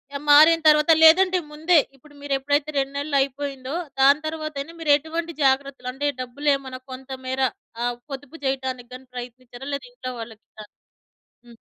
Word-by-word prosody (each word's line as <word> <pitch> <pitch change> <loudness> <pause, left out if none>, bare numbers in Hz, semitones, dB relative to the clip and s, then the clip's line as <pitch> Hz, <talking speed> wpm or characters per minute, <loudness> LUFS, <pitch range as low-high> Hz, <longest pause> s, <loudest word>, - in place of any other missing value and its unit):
ఆహ్, 280 - -4
మారిన 315 +3 +7
తర్వాత 300 +1 +5
లేదంటే 365 +3 +6
ముందే, 320 +3 +3 0.2
ఇప్పుడు 290 +3 -20
మీరు 285 -1 -3
ఎప్పుడైతే 285 +2 0
2 275 0 -1
నెలలు 285 0 -1
అయిపోయిందో. 275 0 -4 0.3
దాని 280 +3 +5
తరువాత 310 -1 -5
అయినా 325 +4 -9
మీరు 300 - +2
ఎటువంటి 325 +3 -5
జాగ్రత్తలు. 265 -1 0
అంటే 290 +2 -1
డబ్బులేమన్నా 265 0 -2
కొంతమేర 260 0 -5 0.4
ఆహ్, 245 0 -2
పొదుపు 280 +4 -8
జేయటానికి 260 -2 -3
గాని 260 +1 -13
ప్రయత్నించారా? 245 +1 -9
లేదా 260 -3 -8
ఇంట్లో 255 0 -6
వాళ్ళకి 225 -1 -11
కా 210 - -8 0.8
హ్మ్. 235 -1 -15
275 Hz, 155 wpm, -23 LUFS, 255-300 Hz, 0.8 s, మారిన